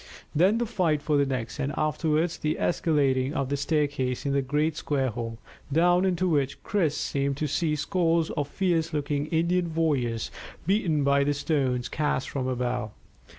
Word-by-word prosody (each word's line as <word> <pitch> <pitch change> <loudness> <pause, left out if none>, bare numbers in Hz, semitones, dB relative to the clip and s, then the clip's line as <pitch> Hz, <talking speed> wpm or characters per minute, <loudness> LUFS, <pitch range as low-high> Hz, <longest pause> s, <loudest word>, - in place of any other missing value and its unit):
Then 185 +8 +4
the 240 - 0
fight 180 -9 +1
for 150 0 +1
the 140 -1 +3
next, 130 -1 -3
and 140 0 -1
afterwards 155 +2 0
the 155 0 -1
escalading 140 -5 +1
of 135 -1 -1
the 140 - 0
staircase 145 -4 -1
in 140 - 0
the 140 - +2
great 150 +4 0
square 135 -4 0
hole, 115 -1 -5 0.3
down 175 +4 +4
into 185 -1 +1
which 140 -5 0
Chris 165 -8 0
seemed 140 0 -1
to 155 - -1
see 150 +2 0
scores 165 +1 +1
of 145 -3 -2
fierce 170 -1 0
looking 145 0 -1
Indian 170 0 0
warriors 130 -9 0 0.3
beaten 170 -6 +2
by 140 0 +3
the 145 +1 +1
stones 135 -5 0
cast 150 -3 -1
from 130 -2 -2
above. 125 -3 -1
150 Hz, 170 wpm, -27 LUFS, 135-165 Hz, 0.3 s, Then